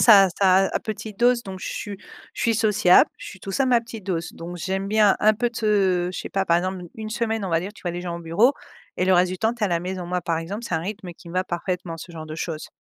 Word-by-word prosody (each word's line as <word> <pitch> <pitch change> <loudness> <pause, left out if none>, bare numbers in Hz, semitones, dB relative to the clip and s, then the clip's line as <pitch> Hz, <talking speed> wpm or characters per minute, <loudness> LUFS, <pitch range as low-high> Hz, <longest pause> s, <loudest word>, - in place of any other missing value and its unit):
ça 205 -4 +8
à 190 - +2
ça 175 - -11 0.3
à - - -2
à - - +1
petite 215 -2 -6
dose 245 0 +4
donc 190 -3 -7
je - - -4
su 205 -2 -5 0.4
je - - -6
suis 230 - +3
sociable, 210 -5 +5
je - - -10
suis 190 - -11
tout 195 - -6
ça 270 - +2
mais 255 -2 +4
à - - +3
petite 225 -3 -10
dose 170 -4 -3
donc 175 +1 -7
j'aime 190 +3 -2
bien 210 -1 +4
un 215 +1 +6
peu 240 +3 0
te 195 -6 +1
je - - -5
sais - - -5
pas 195 0 0
par 170 -2 +3
exemple 185 +1 -3
n 175 - -9
une 215 -1 -6
semaine 225 -2 -1
on - - -3
va 165 0 +2
dire 190 +3 -5
tu - - -15
vois 175 - -2
des 175 - -4
gens 175 -1 -4
au - - -8
bureau 170 +11 +3 0.4
et 180 - +1
le 190 - +5
reste 180 0 +4
du 185 - -5
temps 225 +3 +1
tu 240 - -9
es - - +4
à - - -2
la 170 -1 0
maison. 185 0 -4
Moi 180 0 -1
par 170 -1 -1
exemple 200 +8 -5
c'est - - -1
un 160 - +1
rythme 195 +1 -6
qui 170 - -15
me 175 - -10
va 185 - +1
parfaitement 175 -1 -3
ce 170 +2 -10
genre 160 -1 -7
de 155 - -6
choses. 160 -1 -5
190 Hz, 320 wpm, -24 LUFS, 175-215 Hz, 0.4 s, ça